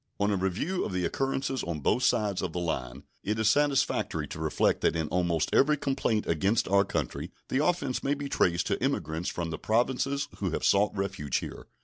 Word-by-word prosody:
On 100 +1 +2
a - - +2
review 95 - -1
of - - -4
the 90 -1 0
occurrences 135 +4 -1
on 85 -2 -3
both 120 - +2
sides 105 -6 +2
of 90 -4 -3
the 90 - -2
line 65 -6 -3 0.2
it 105 +2 -1
is 110 -1 +3
satisfactory 145 +2 +1
to - - -7
reflect 80 -1 +1
that - - +2
in 80 -2 -1
almost 85 -3 0
every 150 +2 +4
complaint 135 -6 0
against 95 +7 +1
our 100 +1 +4
country 85 -9 -3 0.2
the 135 +3 +1
offense 150 -7 0
may 140 +1 +1
be 145 0 -5
traced 85 -9 +1
to - - -1
emigrants 80 +3 -1
from 85 -1 -3
the 80 - -4
Provinces 130 +5 0
who - - 0
have - - -2
sought 105 +1 +3
refuge 95 -8 -1
here. - - -7
100 Hz, 205 wpm, -28 LUFS, 85-135 Hz, 0.2 s, every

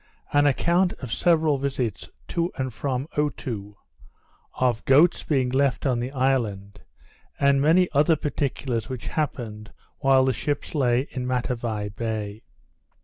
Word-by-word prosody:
_An 145 0 +5
Account 175 +6 +2
of 125 -4 -6
several 160 -4 +2
Visits 130 -6 -3 0.2
to 170 +1 -1
and 130 -2 -3
from 130 +3 -2
Otoo; 115 -8 -3 0.8
of 125 -3 0
Goats 150 +6 +5
being 130 -4 0
left 135 +1 +1
on 125 -3 +1
the 120 +1 -3
Island; 115 -7 -1 0.6
and 140 -1 +4
many 170 +5 +4
other 150 +3 +4
Particulars 135 -5 -2
which 130 -3 -5
happened 115 -8 -4 0.3
while 135 -1 +4
the 130 - +2
Ships 145 +2 -3
lay 125 -5 +2
in 125 -2 -4
Matavai 115 -4 -2
Bay. 110 0 -4
130 Hz, 135 wpm, -25 LUFS, 115-145 Hz, 0.8 s, An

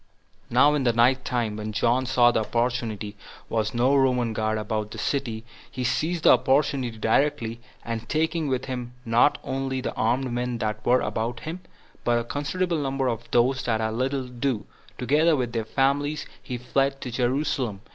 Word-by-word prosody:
4. - - -7
Now, 145 +4 +6
in 145 -2 +1
the 120 -2 +3
night 125 +3 +3
time, 115 -4 -1
when 110 0 -5
John 120 +4 +2
saw 120 -2 +5
that 110 -2 -1
there 115 -4 -1 0.4
was 110 0 -1
no 125 +4 +3
Roman 125 -4 +2
guard 110 0 0
about 110 0 -2
the - - -9
city, 120 -6 -2 0.3
he 130 - -4
seized 160 +6 0
the - - +8
opportunity 130 -4 +2
directly, 115 0 +1 0.3
and, 115 -1 -4
taking 160 0 0
with 130 -2 -1
him 125 -2 -5
not 120 +5 +4
only 135 0 -2
the 130 - -3
armed 125 +3 0
men 120 0 -2
that 110 -1 -3
were 125 +1 +4
about 115 +1 -2
him, 165 +3 -5 0.4
but 120 -1 +2
a 120 - 0
considerable 165 +7 -1
number 135 -2 -1
of 115 -1 -3
those 130 +2 +3
that 110 -2 +1
had 110 0 -1
little 130 +3 -1
to 125 - -10
do, 125 -3 -2 0.3
together 150 +6 +3
with 125 -4 -2
their 115 -2 -1
families, 140 +5 0 0.2
he 125 - -5
fled 135 +3 0
to 125 - -5
Jerusalem. 125 -4 -1
125 Hz, 185 wpm, -25 LUFS, 115-135 Hz, 0.4 s, the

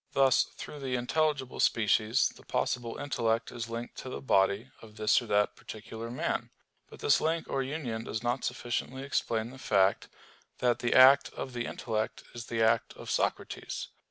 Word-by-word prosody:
Thus 135 -2 +4
through 150 - -8
the 130 -2 -2
intelligible 135 +1 0
species 110 0 +3
the - - -16
possible 120 -2 -2
intellect 115 -4 -1
is 120 -1 -5
linked 115 +1 -6
to 130 - -7
the - - -5
body 100 +1 +2
of 110 -2 -14
this 110 +2 +3
or 120 - -9
that 105 0 +2
particular 110 +1 -8
man. 120 - -2 0.4
But - - -13
this - - +4
link 165 +1 0
or 135 - -1
union 130 -5 -4
does 110 +1 -4
not 120 +2 -1
sufficiently 130 +2 -3
explain 115 -4 -1
the 130 - -12
fact, 100 -5 +2 0.5
that 120 -2 +1
the 120 - 0
act 135 +3 +8
of 130 - -5
the 120 -1 -3
intellect 110 -2 -3
is 120 -1 -7
the 115 -1 0
act 115 +1 +2
of - - -7
Socrates. - - -2
120 Hz, 175 wpm, -30 LUFS, 110-130 Hz, 0.5 s, act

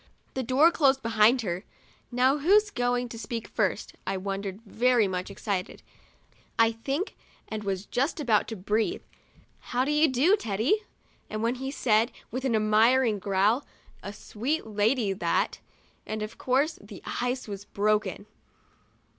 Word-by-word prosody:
The 265 - -2
door 265 +7 +4
closed 270 -5 +3
behind 230 +2 +4
her. 180 -2 -3 0.5
"Now, 260 +4 +3
who's 410 +7 +4
going 245 -4 0
to 230 - -8
speak 230 +1 -5
first?' - - -1 0.2
1 - - 0
I - - -2
wondered, 195 +1 -4
very 235 0 +2
much 185 0 -3
excited, 200 -2 -4 0.7
I 230 -1 +5
think, 275 - -3 0.3
and 215 -1 -5
was 195 -1 -2
just 275 +10 -1
about 230 -8 +2
to 225 - -5
breathe, 215 - -1 0.6
"How 250 +1 -1
do 290 - 0
you 300 +1 +4
do, 290 +9 +4
Teddy?" 235 - 0 0.5
when 225 +2 -1
he 265 +1 -5
said, 230 -4 +2 0.2
with 260 +2 -3
an 245 -4 +2
admiring 220 +2 +3
growl, 200 +7 +2 0.4
'A 200 - -7
sweet 250 +10 -3
lady, 215 0 +1
that," 190 - 0 0.5
and, 215 0 -3
of 215 - -8
course, 275 +5 +1
the - - -12 0.2
ice 250 0 -2
was 200 -1 -7
broken. 205 -1 0
230 Hz, 150 wpm, -27 LUFS, 210-265 Hz, 0.7 s, I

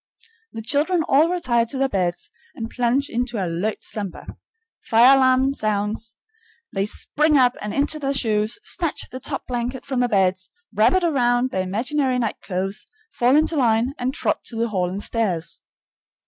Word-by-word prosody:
The 225 - -6
children 315 +8 +1
all 305 +3 +3
retire 245 -10 +1
to 265 - -4
their 270 +1 +2
beds 180 -7 -2 0.2
and 225 -1 -6
plunge 250 +3 +1
into 240 0 -3
alert 185 +3 -2
slumber. 200 -4 -5 0.6
Fire 240 +4 +6
alarm 260 0 +3
sounds. 215 -1 -2 0.6
They 195 0 0
spring 300 +7 +1
up 250 -1 +4
and 210 - -4
into 290 +4 0
their 275 -2 -1
shoes, 215 -3 +1
snatch 335 -4 -1
the 255 - -6
top - - -5
blanket 245 +1 -4
from 265 -3 -2
their 245 -1 +2
beds, 185 -2 +1 0.2
wrap 220 +3 +4
it 370 -1 +2
around 250 -5 +2
their 185 - -1
imaginary 250 +8 -1
nightclothes, 195 -4 -3 0.3
fall 245 +3 +3
into 310 +2 +3
line, 240 -1 +2
and 250 +1 -1
trot - - -1
to 235 - -6
the 230 +1 -1
hall 185 -4 -1
and 195 +3 -4
stairs. 195 -8 -2
240 Hz, 165 wpm, -22 LUFS, 210-270 Hz, 0.6 s, Fire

